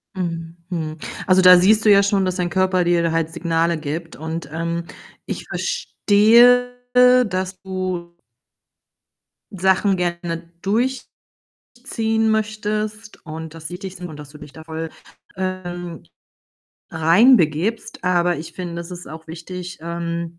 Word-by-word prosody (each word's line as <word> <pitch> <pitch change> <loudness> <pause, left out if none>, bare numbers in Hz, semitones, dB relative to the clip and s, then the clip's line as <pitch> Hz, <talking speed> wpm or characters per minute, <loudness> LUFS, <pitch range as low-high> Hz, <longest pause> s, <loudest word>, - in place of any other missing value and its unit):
Mhm, 165 -2 -4
mhm. 160 -3 -4 0.3
Also, 185 0 +4
da 180 0 +9
siehst 215 +5 +4
du - - +6
ja 200 0 +6
schon, 200 -1 +1
dass 185 -1 -1
dein 180 -2 -1
Körper 185 0 +2
dir 170 -1 +2
halt 165 0 -1
Signale 165 0 0
gibt 160 +3 -5
und, 160 -1 -5
ähm, 170 +1 -3 0.4
ich - - -5
verstehe, 245 - +4 0.2
dass 235 -7 +3
du 185 -2 -4 1.4
Sachen 190 +1 +2
gerne 170 -1 -3
durchziehen 240 +7 -2 1.0
möchtest 215 0 -3
und 160 0 -7
dass 160 -1 -8
sie 175 - -7
dich 190 -1 -8
und 170 -4 -7
dass 150 -2 -10
du 150 - -13
dich 145 - -13
da 160 - -11
voll, 160 0 -5 0.5
ähm, 175 -2 -5 0.9
reinbegibst, 175 - +3
aber 175 -1 +2
ich 155 +2 -8
finde, 175 -2 -6
das 170 +1 -6
ist 180 0 -8
auch 160 +1 -10
wichtig, 180 +2 -8
ähm, 170 0 -4
175 Hz, 130 wpm, -21 LUFS, 165-195 Hz, 1.4 s, da